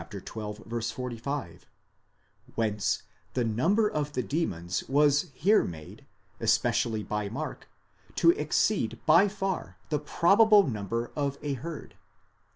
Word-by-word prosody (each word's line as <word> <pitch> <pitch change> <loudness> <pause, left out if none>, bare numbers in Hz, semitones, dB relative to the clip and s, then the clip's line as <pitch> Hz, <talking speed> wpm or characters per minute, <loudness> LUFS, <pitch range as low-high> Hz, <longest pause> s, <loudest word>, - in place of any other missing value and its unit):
45); 120 - -5 0.9
whence 105 -3 0 0.3
the 125 - +1
number 165 - +2
of 150 -6 -2
the 125 - -1
demons 90 - -2
was 145 +3 +3
here 200 +11 +4
made, 80 -3 -9 0.3
especially 110 -2 +1
by 105 -1 -3
Mark, 145 +8 -6 0.5
to 335 - +6
exceed 195 - 0
by 170 +6 +6
far 195 - -3
the 150 - 0
probable 205 +8 +5
number 115 -1 -3
of 140 -2 -1
a 145 -1 -1
herd. 150 +3 -7
140 Hz, 110 wpm, -28 LUFS, 110-170 Hz, 0.9 s, to